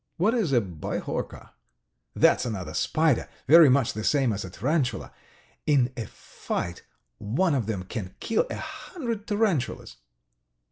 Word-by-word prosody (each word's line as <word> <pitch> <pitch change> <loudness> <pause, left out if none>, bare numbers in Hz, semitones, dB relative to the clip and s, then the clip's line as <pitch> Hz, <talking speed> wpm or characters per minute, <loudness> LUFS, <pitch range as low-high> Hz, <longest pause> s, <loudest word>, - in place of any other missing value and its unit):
"What 205 +7 +2
is 215 - 0
a 125 - +5
bihorka?" 90 -7 -5 0.6
"That's - - +4
another 95 -10 -4
spider, 155 - +1 0.2
very 160 +1 +8
much 130 -2 +3
the 110 - -5
same 135 -4 +2
as 100 - -4
a 95 - -7
tarantula. 130 - -1 0.5
In 135 -4 +3
a 115 -4 -5
fight 85 0 -5 0.4
one 145 - +1
of 125 -7 0
them 100 -5 -2
can 95 -1 -6
kill 225 - 0
a - - -3
hundred 235 - -6
tarantulas." 205 - -1
130 Hz, 140 wpm, -26 LUFS, 105-170 Hz, 0.6 s, very